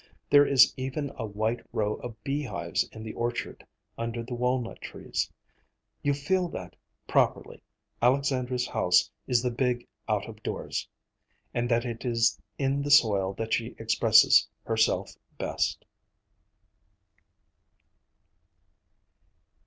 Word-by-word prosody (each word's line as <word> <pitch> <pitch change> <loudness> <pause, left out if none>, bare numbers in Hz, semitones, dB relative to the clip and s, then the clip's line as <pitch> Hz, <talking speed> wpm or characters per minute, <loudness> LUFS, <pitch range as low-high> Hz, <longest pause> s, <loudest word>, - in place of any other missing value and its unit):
There 145 0 +7
is 130 -3 +6
even 135 +2 -3
a 115 - -4
white 110 +3 -2
row 105 -1 0
of 115 -3 -9
beehives 140 0 -2
in 110 - -9
the 110 - -6
orchard, 120 0 -4 0.3
under 115 0 -3
the 125 +2 -7
walnut 125 0 -1
trees. - - -4 0.7
You 145 0 +1
feel 180 +5 0
that, 90 - -8 0.3
properly, - - +1 0.4
Alexandra's 125 -1 +1
house 90 0 +2 0.2
is 125 -2 +2
the 125 - 0
big 125 0 -1 0.2
out - - 0
of - - -11
doors, - - -4 0.6
and 120 0 -1
that 120 +1 +2
it 115 -2 -5
is 115 -2 +1 0.2
in 135 +1 0
the 145 - -3
soil 100 -9 +4
that 115 0 -3
she - - -1
expresses - - +5 0.2
herself 110 -1 +1 0.3
best. - - -2
120 Hz, 120 wpm, -28 LUFS, 115-135 Hz, 0.7 s, There